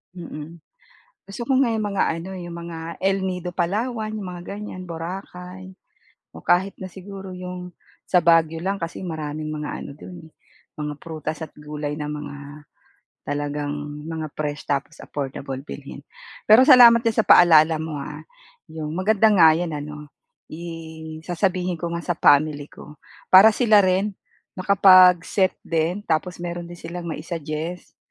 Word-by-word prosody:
Mm, 165 -1 -9 0.7
gusto 200 - -7
ko 270 - +1
nga 245 - +3
'yong 220 -2 -1
mga 200 -2 0
ano 170 +3 -7
'yong 175 -2 -7
mga 165 -1 -7 0.2
El 195 +1 0
Nido, 180 -1 -3
Palawan, 215 +6 -1
'yong 205 - -6
mga 180 -1 -7 0.2
ganyan, 185 -4 -8
Boracay 180 +2 -7 0.7
o - - -12
kahit 190 +3 +2
na 190 - -9
siguro 190 0 -9
'yong 180 0 -7 0.3
sa 180 - +3
Baguio 165 -1 +3
lang 195 +3 -1
kasi 165 -3 -6
maraming 155 -3 -5
mga 150 -1 -5
ano - - -8
do'n, 170 -1 -11
eh, - - -29 0.4
mga 150 -1 -4
prutas 155 -1 -6
at 160 - -5
gulay 150 0 -5
na 150 -1 -4
mga 150 -1 -7 0.9
talagang 145 0 -3 0.3
mga 160 -1 -5
fresh 145 -2 -4
tapos 140 0 -2
affordable 135 -1 -5
bilhin. - - -9 0.4
Pero 240 +6 +6
salamat 240 -4 +9
diyan 230 -2 -1
sa 220 - +3
paalala 160 -2 +6
mo 160 -2 -5
ha, - - -8 0.5
'yong 155 -1 -6
maganda 210 +5 +3
nga 160 -5 +6
'yan 170 -1 -3
ano, 150 0 -7 0.4
i 160 - -7 0.6
sasabihin 180 -1 -1
ko 170 - -2
nga 170 - -6
sa 175 - 0
family 145 -2 +3
ko 150 0 -14 0.3
para 195 +4 +10
sila 220 -4 +5
rin 190 +2 +1 0.4
makapag-set 185 -1 +5
din 165 +5 -1
tapos 175 +2 -1
meron 175 0 -6
din 175 - -10
silang 170 +1 -7
ma-i-suggest 160 +1 -5
175 Hz, 150 wpm, -23 LUFS, 155-190 Hz, 0.9 s, para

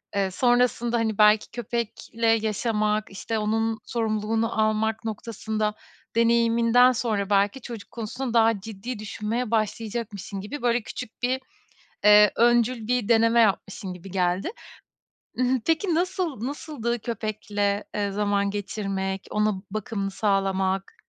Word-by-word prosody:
Eee, 195 -1 +1
sonrasında 240 +1 +2
hani 220 -2 -1
belki 210 0 +5
köpekle 230 -1 -3
yaşamak, 215 -1 +1
işte 215 +3 -3
onun 225 +1 0
sorumluluğunu 225 0 -1
almak 220 +1 0
noktasında 215 -1 -2 0.4
deneyiminden 235 +1 +4
sonra 215 -4 -1
belki 205 +6 +2
çocuk 230 -3 -9
konusunda 235 +2 -4
daha 225 -2 +4
ciddi 220 +3 -7
düşünmeye 215 +3 -3
başlayacakmışsın 215 -3 -2
gibi 285 +9 -6
böyle 240 0 +2
küçük 230 +2 -8
bir, 255 +2 +1 0.7
eee, 210 0 +8
öncül 240 -1 +3
bir 245 -2 0
deneme 230 0 +5
yapmışsın 195 -2 0
gibi 180 +2 -11
geldi. 180 - 0 0.9
I - - +2
hı, 255 0 +2
peki 330 +2 +1
nasıl, 350 - -1
nasıldı 265 -5 -3
köpekle, 210 -2 -2
eee, 205 -1 -1
zaman 200 0 0
geçirmek, 195 -1 -3
ona 210 0 +2 0.2
bakımını 200 -1 -3
sağlamak? 195 -1 0
220 Hz, 120 wpm, -25 LUFS, 205-235 Hz, 0.9 s, eee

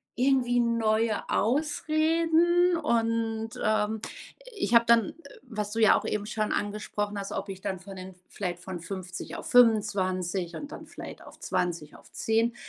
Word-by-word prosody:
irgendwie 250 -1 +2
neue 225 -2 +1
Ausreden. 320 - +2
Und, 230 -5 0
ähm, 215 0 +1 0.5
ich 240 - 0
habe 235 0 +7
dann 230 -3 +3 0.3
was 210 -5 -4
du 225 - -2
ja 220 - +6
auch - - -5
eben 210 -1 -2
schon 215 -1 -1
angesprochen 205 0 -3
hast, 195 - -5
ob 205 - -4
ich 190 -1 -7
dann 190 -2 -3
von 195 +1 -10
den 185 0 -8 0.2
vielleicht 180 -3 -4
von 180 0 -6
50 185 0 -6
auf - - -7
25 190 -6 +2
und 290 0 -7
dann - - -8
vielleicht - - -9
auf - - -14
20 170 -4 -2
auf - - -17
10, 230 +2 +1
220 Hz, 155 wpm, -28 LUFS, 195-240 Hz, 0.5 s, habe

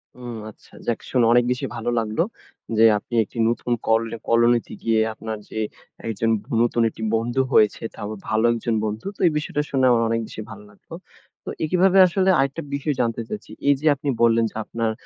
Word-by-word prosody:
হুম, 120 -2 -7
আচ্ছা। - - -19
যাক, 115 - 0
শুনে 125 -3 +3
অনেক 120 0 +5
বেশি 125 - -2
ভালো 115 +1 -3
লাগলো, 110 +5 -1 0.6
যে 115 - +5
আপনি 110 - -11
একটি 115 - -14
নতুন 120 +1 -2 0.2
কল 110 +1 +3 0.3
কলোনিতে 120 0 +3
গিয়ে 115 -1 +2
আপনার 110 0 -6
যে 110 - -5 0.5
একজন 115 +1 -1 0.3
নতুন 120 0 +2
একটি 110 - -9
বন্ধু 120 +4 0
হয়েছে, 105 -1 +4
তাও 105 - -6 0.2
ভালো 110 +1 +1
একজন 115 0 -1
বন্ধু। 110 +1 -4
তো - - -27
এই - - +3
বিষয়টা 150 -1 -2
শুনে 130 -2 +2
আমার 115 -1 +3
অনেক 115 0 +1
বেশি 110 - -8
ভালো - - -10
লাগলো। 105 - -16 0.5
তো - - -7
এইভাবে 185 +4 +3
আসলে 190 +2 +1
আরেকটা 140 +4 0
বিষয় 140 +1 -1
জানতে 115 -1 -1
চাচ্ছি, 210 - -7 0.2
এইযে 145 +2 +2
আপনি 140 +1 -4
বললেন 115 0 +4
যে, - - -28
আপনার 115 0 -2
115 Hz, 185 wpm, -23 LUFS, 110-135 Hz, 0.6 s, অনেক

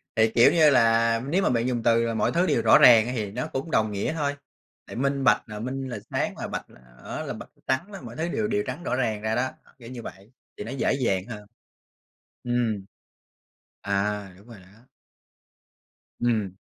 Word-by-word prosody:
Thì, 110 0 +3
kiểu 120 - +7
như 160 -3 +5
là, 115 -3 +3
nếu 180 +7 +1
mà - - +2
bạn 120 -1 +1
dùng 120 -2 -2
từ 115 0 +2
mọi - - +1
thứ 175 +2 +2
đều - - +1
rõ - - +6
ràng 115 -2 +7
á 125 - -3
thì 105 -4 -3
nó 125 +5 -4
cũng 145 +5 -5
đồng 110 -5 +2
nghĩa 100 +9 -2
thôi. 145 -3 -1 0.5
Tại - - -9
minh 140 +2 -1
bạch 120 - +4
là 105 -1 -6
minh 130 +3 -4
là 120 - -5
sáng - - -2
là - - -4
bạch, - - -5 0.4
á, - - -5
là - - -5
bạch - - -10 0.2
trắng 130 +7 0
á, 195 - -8
mọi 120 -2 -10
thứ 160 +5 -2
đều 215 +4 -1
đều 205 -1 0
trắng 140 +7 -5
rõ - - -1
ràng 110 -5 -1
ra 110 +1 -1
đó, 130 +2 0 0.3
kiểu 115 -1 -11
như 125 -2 -7
vậy, 100 0 -11 0.3
thì - - -5
nó 115 - -7
dễ 135 -1 0
dàng 100 -9 0
hơn. 105 -4 -8 1.0
Ừm. 120 -5 -1 1.0
À, 100 -1 -2
đúng 100 - -19
rồi 110 -5 -12
đó. 100 +4 -20 1.4
Ừm. 110 -6 -1
120 Hz, 210 wpm, -25 LUFS, 110-135 Hz, 1.4 s, kiểu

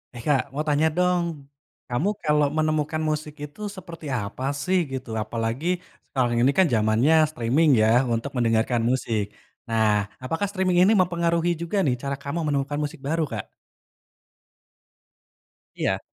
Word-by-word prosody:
Eh - - -7
Kak, 140 -3 +4
mau 150 +2 -1
tanya 150 +2 +3
dong. 180 -1 +2 0.6
Kamu 135 +11 0
kalau 150 -1 +3
menemukan 155 0 0
musik 150 0 -3
itu, 150 +7 -9 0.2
seperti 170 -3 -10
apa 100 +5 -6 0.2
sih, 185 +5 +2
gitu? 130 -2 -5
Apalagi, 115 +7 -3 0.4
sekarang 125 -3 +1
ini 135 - +5
kan, 190 - +6
jamannya 110 +7 +3 0.2
streaming 140 +4 +2
ya, - - +4 0.3
untuk 115 +5 -2
mendengarkan 115 0 +2
musik. 115 -4 0 0.4
Nah, 110 -1 +2 0.4
apakah 165 +10 -1
streaming 185 -3 +1
ini 195 - +5
mempengaruhi 170 -1 +1
juga 170 +4 -2
nih, 130 -4 +2
cara 140 0 -1
kamu 145 +4 -3
menemukan 145 0 -1
musik 150 +1 -5
baru, 165 +2 +1
Kak? 110 -3 -3 2.3
Iya. - - -1
145 Hz, 140 wpm, -24 LUFS, 120-165 Hz, 2.3 s, kan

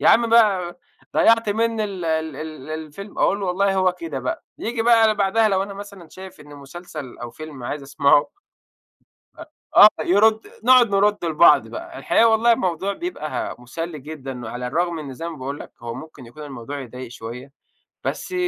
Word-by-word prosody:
يا - - +4
عم 235 +1 +5
بقى 195 -7 +3 0.4
ضيّعت 230 -1 +4
مني 225 +1 0
ال 195 -4 -5
ال 160 -2 -1
ال 155 -1 -8
الفيلم." 160 +6 -8
أقُول 200 - +2
له 195 - -2
:"والله 195 +2 +1
هو 185 -1 +2
كده 165 -6 -6
بقى." 130 -1 -4
ييجي 230 0 -2
بقى 225 -2 +5
بعدها 210 +2 +2
لو 195 -1 +1
أنا 200 0 -7
مثلًا 200 -4 -10
شايف 185 +1 -12
إن 145 -1 -13
مسلسل، 145 -1 -9
أو 120 -1 -7
فيلم 150 -4 -10
عايز 145 +4 -4
اسمعه 140 - +3 1.1
أ - - -9 0.3
آه. 210 - +11
يرُد 215 +4 +3 0.2
نقعد 255 -2 +6
نرُد 205 0 +2
لبعض 155 -3 +5
بقى. 335 0 -8
الحقيقة 230 - +3
والله 225 +1 +4
الموضوع 190 -2 -1
بيبقى 200 - -4
مُسلّي 155 +7 -6
جدًا، 135 -4 -8
وعلى 125 +2 -5
الرغم 170 +5 -1
إن 140 -4 -7
زي 165 +6 -5
ما 165 - -7
باقول 140 +1 -5
لك، - - -10
هو 115 0 -5
ممكن 155 -5 -11
يكون 135 +6 -12
الموضوع 140 0 -7
يضايق 125 0 -8
شوية، 125 +3 -9 0.5
بس - - -4
170 Hz, 180 wpm, -22 LUFS, 140-205 Hz, 1.1 s, آه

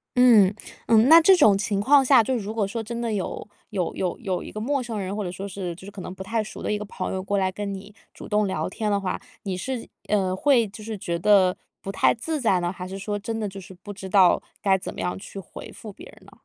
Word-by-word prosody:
嗯。 225 -6 +6 0.3
嗯， 225 +1 +5
那 330 +3 +9
这 380 +4 +7
种 210 - +6
情 200 0 -1
况 270 +6 +5
下， 255 -2 +6
就 260 +4 -1
如 215 -2 -4
果 215 -3 0
说 225 +3 -4
真 235 +2 -5
的 230 -2 -2
有 195 -1 -4 0.2
有 190 -5 -2
有 180 -2 -2
有 190 -6 -3
一 - - -9
个 215 - -6
陌 270 +3 -1
生 225 -3 -4
人， 195 +1 -4
或 210 - -2
者 180 - -4
说 195 +2 -6
是 185 -2 -5
就 185 - -13
是 200 - -9
可 200 -1 -9
能 180 - -7
不 190 - -11
太 220 +3 -1
熟 - - -9
的 - - -2
一 210 - 0
个 210 - -5
朋 190 -2 -5
友 190 0 -3
过 200 +1 -1
来 190 -1 +1
跟 200 +1 -4
你 200 +2 -9 0.2
主 - - -10
动 210 0 +2
聊 160 -4 -2
天 210 +2 -2
的 200 - +2
话， 185 -2 -3 0.2
你 190 -2 -3
是， 245 +6 -4 0.2
呃， 190 -3 +1
会 240 +1 +3
就 210 +2 -11
是 220 -1 -5
觉 175 -3 -3
得 185 0 +4 0.3
不 195 - -5
太 195 - +3
自 305 +6 -3
在 195 -7 +3
呢， 175 0 -1
还 180 -1 -7
是 195 +1 -7
说 205 +1 -3
真 225 +2 -4
的 215 - -2
就 195 0 -8
是 185 - -12
不 195 +3 -10
知 190 -1 -8
道 185 -3 +5 0.2
该 190 -1 +3
怎 190 - -7
么 - - -9
样 180 - -2
去 195 +1 -9
回 190 - -10
复 215 -3 -10
别 - - -13
人 - - -17
呢？ - - -17
200 Hz, 300 characters per minute, -24 LUFS, 190-225 Hz, 0.3 s, 那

